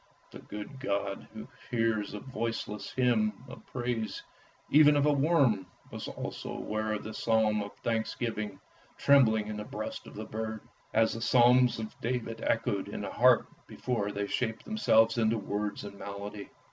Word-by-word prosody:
The - - -10
good 105 +6 -8
God 100 -5 -2
who 110 0 -9 0.2
hears 115 -3 0
the 105 - -4
voiceless 115 -4 -4
hymn 115 -3 +1
of 130 - -11
praise 120 -3 -3 0.5
even 150 0 +7
of 145 0 +3
a 150 - +4
worm, 135 - +3 0.2
was - - -6
also - - -6
aware 110 0 -2
of 105 - -3
this 110 - -6
psalm 110 -2 +2
of 100 0 -7
thanksgiving 110 -3 -2 0.4
trembling 115 -7 +5
in 105 0 -5
the 105 - -4
breast - - -6
of - - -12
the - - -5
bird, 110 0 -4 0.3
as 110 0 +3
the 115 - -5
psalms 125 +1 +5
of 110 -1 -7
David 115 -1 -2
echoed 110 -3 0
in - - -5
his - - -5
heart - - +5 0.2
before 105 -5 -2
they 100 0 -2
shaped 115 +2 -2
themselves 115 - +3
into 115 0 +2
words 105 0 -3
and 100 -1 -9
melody. 100 +1 -7
110 Hz, 165 wpm, -30 LUFS, 105-125 Hz, 0.5 s, even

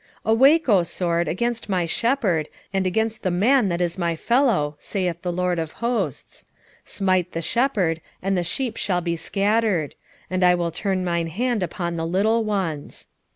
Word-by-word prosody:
13:7 220 - +2
Awake, 275 +8 +5
O 200 -4 +6
sword, 170 0 -1
against 230 +4 -2
my 180 -3 +1
shepherd, 195 - +1 0.2
and 190 -1 +1
against 220 +3 -1
the 185 - 0
man 210 +5 +3
that 170 -1 -1
is 175 +1 -1
my 170 -1 0
fellow, 215 - +1
saith 180 -4 -3
the 180 - -2
LORD 180 0 0
of 160 -1 -4
hosts: 225 - -3 0.4
smite 185 -2 0
the 165 - -2
shepherd, 190 - +1 0.2
and 195 +1 -1
the 180 - +1
sheep 230 +7 -2
shall 180 -3 0
be 170 -1 -1
scattered: 200 -3 0 0.3
and 185 0 -1
I 180 0 +6
will 170 -1 -1
turn 190 +1 -1
mine 170 -1 0
hand 235 +6 -1
upon 170 -1 -3
the 165 0 -2
little 215 +6 +2
ones. 190 -9 -3
185 Hz, 175 wpm, -23 LUFS, 170-220 Hz, 0.4 s, O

